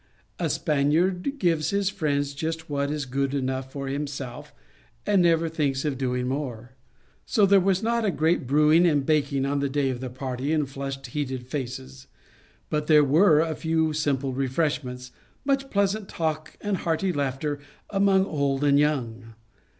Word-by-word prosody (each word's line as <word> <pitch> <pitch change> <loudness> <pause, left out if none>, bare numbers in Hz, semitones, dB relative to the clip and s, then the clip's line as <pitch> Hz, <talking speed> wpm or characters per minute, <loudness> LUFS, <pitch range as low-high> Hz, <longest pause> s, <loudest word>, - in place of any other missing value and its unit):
A - - 0
Spaniard 175 - +1
gives 165 - +1
his 200 0 0
friends 145 -7 -1
just 160 +2 -4
what 140 0 0
is 150 -1 -2
good 135 +2 -1
enough 130 -1 -2
for 140 -1 -5
himself, 140 0 -5 0.5
and 205 -3 +3
never 165 -1 +3
thinks 145 -4 -1
of 145 -3 0
doing 125 -1 -1
more. 125 -3 -4 0.6
So 210 - +4
there 195 0 +6
was 190 +2 +1
not 235 +1 +1
a 210 - +2
great 160 -4 +1
brewing 155 +5 +5
and 145 -4 +2
baking 140 -3 +1
on 140 +1 0
the 140 0 0
day 135 -1 0
of 125 - -5
the 130 0 -5
party, 130 +3 -3
and 150 -3 +1
flushed, 135 0 -6
heated 130 -1 -4
faces; 130 0 -6 0.6
but 150 0 -1
there 150 -2 +6
were 155 +2 +5
a 160 -1 -1
few 160 0 0
simple 140 -3 -1
refreshments, 130 -2 -2 0.3
much 275 -1 0
pleas 200 0 +2
ant 215 -3 -8
talk 155 -1 -3
and 205 -2 -1
hearty 175 +3 -1
laughter 145 +1 -2 0.3
among 195 -1 +3
old 140 -5 -1
and 140 -1 +4
young. 120 -6 -1
145 Hz, 165 wpm, -25 LUFS, 135-165 Hz, 0.6 s, there